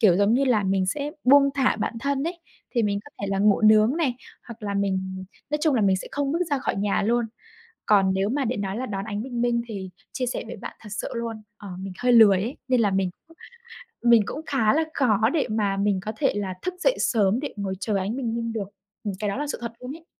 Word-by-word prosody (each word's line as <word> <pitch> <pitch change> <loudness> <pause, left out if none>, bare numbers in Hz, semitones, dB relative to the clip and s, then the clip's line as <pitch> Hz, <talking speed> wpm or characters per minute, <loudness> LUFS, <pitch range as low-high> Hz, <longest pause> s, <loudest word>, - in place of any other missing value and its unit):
kiểu, 185 -5 +5
giống 205 +4 +3
như 275 +2 +3
là 230 -5 +3
mình 190 -1 +1
sẽ 290 +8 -2
buông 280 +2 +6
thả 265 -2 +2
bản - - -2
thân 280 +2 -1
ấy, 345 0 -8 0.3
thì 235 -3 +1
mình 200 -1 0
có 290 - -13
thể 200 - -2
là 195 - 0
ngủ 205 +1 +4
nướng 215 +5 +5
này 285 -8 +1 0.3
hoặc 230 -1 -10
là 200 -1 -3
mình 190 -1 -2 0.3
nói 300 - 0
chung 310 -4 +3
là 230 - +2
mình 190 -1 +3
sẽ - - -6
không 285 0 -1
bước 335 - 0
ra 285 - +2
khỏi - - -2
nhà 200 0 +1
luôn. 235 +2 +1 0.6
Còn 195 -2 +4
nếu 195 +1 +1
mà 270 +4 0
để 245 0 -1
nói 195 -1 -3
là 255 +2 -3
đón 195 -1 -4
ánh 210 0 -4
bình 245 -3 -4
minh 235 -1 +1
thì 195 -4 -6 0.2
chia 255 - -2
sẻ 245 - -3
với - - -7
bạn - - -8
thật 210 - -11
sự 210 - -3
luôn, 230 -2 -4 0.2
ờ, 205 - -9
mình 190 -1 -6
hơi 245 0 +2
lười 215 -5 +7
ấy 240 +6 -4
nên 255 -2 +3
là 205 - +3
mình 190 -1 0 0.2
cũng 330 - -19 0.7
mình 235 -2 +6
cũng 295 - -5
khá 240 -4 +2
là 320 +1 +2
khó 220 -3 +3
để 305 - +2
mà 205 -2 0
mình 200 -1 +1
có 215 +2 -4
thể 215 - +1
là 195 -2 -2
thức 365 0 -3
dậy - - +3
sớm 215 0 +2
để 290 - -5
ngồi 195 -1 -3
chờ 210 -3 -1
ánh 195 +5 -2
bình 235 -4 -2
minh 230 -1 -3
được. 205 -4 -4 0.4
Ừm, 205 -2 -2
cái 210 -2 -1
đó - - -3
là 295 +1 -2
sự 285 - -4
thật 235 -1 -5
luôn 260 +5 -6
ấy. 330 0 -19
220 Hz, 265 wpm, -25 LUFS, 200-260 Hz, 0.7 s, lười